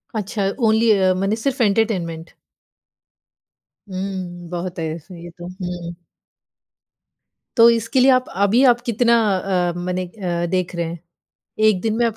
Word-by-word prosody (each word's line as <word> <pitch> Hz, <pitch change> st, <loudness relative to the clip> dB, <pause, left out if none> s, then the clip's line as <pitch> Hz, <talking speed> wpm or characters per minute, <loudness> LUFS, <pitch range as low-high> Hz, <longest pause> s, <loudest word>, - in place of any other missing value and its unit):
अच्छा, 205 Hz, -1 st, -1 dB, 0.2 s
ओनली 220 Hz, +1 st, +4 dB
अ, 190 Hz, -3 st, +3 dB
मने 200 Hz, +3 st, +1 dB
सिर्फ़ 255 Hz, +3 st, -2 dB
एंटरटेनमेंट। 190 Hz, -7 st, 0 dB, 1.6 s
हुँ, 185 Hz, -2 st, -5 dB
बहुत 175 Hz, 0 st, -5 dB
है 160 Hz, -, -2 dB
इसमें 170 Hz, +2 st, -12 dB
ये 175 Hz, -, -9 dB
तो। 175 Hz, 0 st, -8 dB
हुँ। 180 Hz, -2 st, -6 dB, 1.6 s
तो 230 Hz, 0 st, +8 dB
इसके 230 Hz, +3 st, 0 dB
लिए 265 Hz, +2 st, +5 dB
आप, 255 Hz, 0 st, +3 dB
अभी 200 Hz, +6 st, +3 dB
आप 240 Hz, 0 st, -2 dB
कितना 235 Hz, 0 st, +2 dB, 0.2 s
अ, 180 Hz, -2 st, 0 dB
मने 180 Hz, +1 st, -3 dB
अ, 175 Hz, -3 st, -3 dB
देख 185 Hz, -1 st, -1 dB
रहे 170 Hz, -1 st, -1 dB
हैं? 165 Hz, 0 st, -6 dB, 0.7 s
1 205 Hz, -4 st, +3 dB
दिन 220 Hz, +1 st, -1 dB
में 240 Hz, -, +2 dB
आप 225 Hz, -, -3 dB
190 Hz, 150 wpm, -20 LUFS, 175-225 Hz, 1.6 s, तो